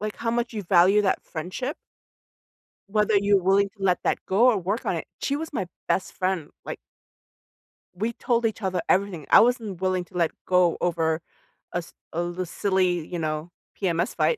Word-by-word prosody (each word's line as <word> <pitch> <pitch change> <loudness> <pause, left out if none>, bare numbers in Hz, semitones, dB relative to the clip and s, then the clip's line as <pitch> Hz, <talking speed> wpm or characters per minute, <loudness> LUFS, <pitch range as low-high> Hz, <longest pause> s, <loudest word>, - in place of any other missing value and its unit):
Like, 215 0 -3
how 230 -1 -1
much 235 0 -1
you 210 - -4
value 185 +3 +5
that 190 - +1
friendship? 185 - -4 1.2
Whether 210 +1 +2
you're 200 -1 +3
willing 195 +2 +3
to 200 -2 -11
let 180 -2 +3
that - - +1
go 210 +6 +4
or 220 - +2
work 200 +7 -2
on - - 0
it. - - -4 0.2
She 280 - 0
was 320 +2 -4
my 215 -10 -2 0.2
best 185 - 0
friend. 185 -5 -1 0.2
Like - - -5 1.2
we 220 +6 -2
told 235 0 0
each 220 0 -1
other 185 -3 -1
everything. 185 -6 +1
I - - +9
wasn't 225 -6 0
willing 185 -1 0
to 180 - -10
let 170 -2 +2
go 180 -2 +3
over 165 -2 +1 0.5
a - - 0
s 170 - -11 0.2
a 170 - 0
little 175 +1 -3
silly, 180 -2 0
you 175 -2 -4
know, 155 +1 -3 0.3
PMS 175 +4 0
fight. 475 - +2
190 Hz, 190 wpm, -25 LUFS, 175-215 Hz, 1.2 s, I